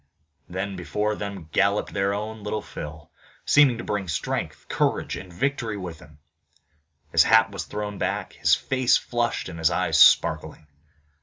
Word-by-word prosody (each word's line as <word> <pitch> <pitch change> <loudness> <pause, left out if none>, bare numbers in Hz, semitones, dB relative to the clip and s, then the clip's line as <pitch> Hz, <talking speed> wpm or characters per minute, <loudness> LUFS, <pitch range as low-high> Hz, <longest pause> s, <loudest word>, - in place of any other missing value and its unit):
Then 95 +2 -4
before 105 +4 -2
them 100 -5 -6
galloped 100 +3 +1
their 100 0 +1
own 105 +2 -4
Little 105 +1 -3
Phil, 75 0 -9 0.3
seeming 140 -5 +5
to 120 - -6
bring 105 -2 -3
strength, 80 - -3
courage - - 0
and 90 - -9
victory 120 +1 -2
with 90 -4 -7
him. 75 -1 -17 0.9
His 80 - +5
hat 110 +3 +5
was 100 - -5
thrown 105 -1 -5
back, - - -2
his - - +3
face 130 -2 +2
flushed, 120 -1 -2
and 85 -2 -8
his 80 - +3
eyes - - +1
sparkling. - - +4
100 Hz, 155 wpm, -24 LUFS, 90-110 Hz, 0.9 s, seeming